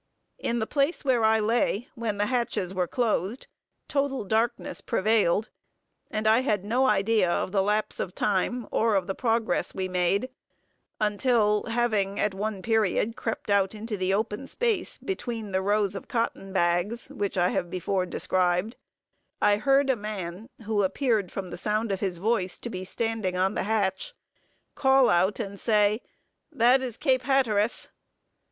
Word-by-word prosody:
In 235 - -1
the 220 - 0
place 285 +5 0
where 250 -4 +2
I 220 0 +4
lay, 225 +1 +1
when 225 -4 -3
the 205 - +1
hatches 215 -6 -1
were 180 -2 0
closed, 225 -1 -1 0.4
total 275 -3 -1
darkness 225 +4 -1
prevailed; 215 -2 +1 0.6
and 215 -2 -3
I 220 +2 +5
had 210 -7 0
no 250 +5 +2
idea 210 -3 +2
of 180 - -1
the 195 -1 +2
lapse 210 +2 -1
of 185 - -4
time, 210 +4 0
or 225 -2 +2
of 190 -2 +1
the 195 - -2
progress 225 -4 0
we 190 -1 -2
made, 185 +7 0 0.7
until, 210 0 +2
having 220 -4 0
at 210 - +1
one 200 -1 -4
period 225 0 +1
crept 225 -2 -4
out 200 0 +2
into 215 +1 -4
the 185 -1 -1
open 215 +5 -1
space, 455 - -1
between 235 - -4
the 190 0 +1
rows 205 0 +1
of 195 - -7
cotton 230 -4 -2
bags, 180 +6 0
which 205 -9 -3
I 180 0 +3
have 175 - -2
before 185 +1 -1
described, 180 +4 0 0.6
I 205 0 +4
heard 275 +5 +3
a - - +1
man, 205 -1 -6 0.2
who 210 -1 +1
appeared 210 -1 0
from 185 -2 -5
the - - -6
sound 215 0 -1
of 195 - -1
his 190 -4 -2
voice 190 -1 0
to 235 - -7
be 185 -2 -5
standing 220 -3 -2
on 190 +2 +1
the - - -2
hatch, 220 - -1 0.6
call 265 -1 +4
out 185 +5 +2
and 200 -3 -5
say, 210 0 +2 0.5
"That 260 -1 +4
is 245 -4 -4
Cape 260 -2 +2
Hatteras." 240 -5 +1
215 Hz, 165 wpm, -27 LUFS, 195-235 Hz, 0.7 s, I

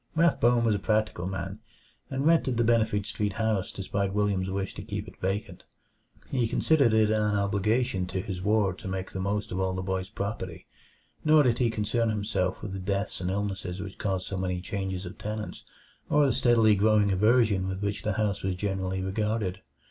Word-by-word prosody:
Rathbone 125 -8 +4
was 115 -2 +3
a 100 - 0
practical 105 -4 0
man, 95 +1 -4 0.5
and 135 +1 -2
rented 160 -7 +3
the 120 - +3
Benefit 110 -3 +2
Street 105 -1 -2
house 110 -3 0
despite 100 0 -2
William's 100 -2 +1
wish 95 0 -3
to - - -7
keep - - -5
it - - -14
vacant. 95 +3 -3 0.7
He 125 -4 +1
considered 140 0 +3
it 110 -1 +4
an 105 -1 +2
obligation 100 0 +1
to 95 - -3
his 95 -1 -4
ward 100 -2 +1
to - - -7
make 95 0 -4
the 95 - -5
most 100 +2 -2
of 95 - -2
all 95 0 0
the 95 - -3
boy's 95 0 -2
property, 100 -5 -5 0.6
nor 155 -1 +6
did 120 -3 +2
he 120 -2 +3
concern 115 +1 0
himself 100 -3 -1
with 105 - -4
the 95 - -4
deaths 100 +1 -2
and 90 - -1
illnesses 95 -2 -3
which 95 0 -7
caused 95 -4 -1
so 95 - -4
many 90 -1 -1
changes 95 0 -4
of 90 - -9
tenants, 105 0 -5 0.5
or 150 0 +4
the 135 - +2
steadily 120 -3 +4
growing 105 0 +3
aversion 105 -1 +3
with 95 +1 -4
which 100 +1 -1
the 110 -1 -1
house 100 -1 0
was 95 -1 -1
generally 95 -1 -2
regarded. 105 0 -1
100 Hz, 195 wpm, -28 LUFS, 95-110 Hz, 0.7 s, nor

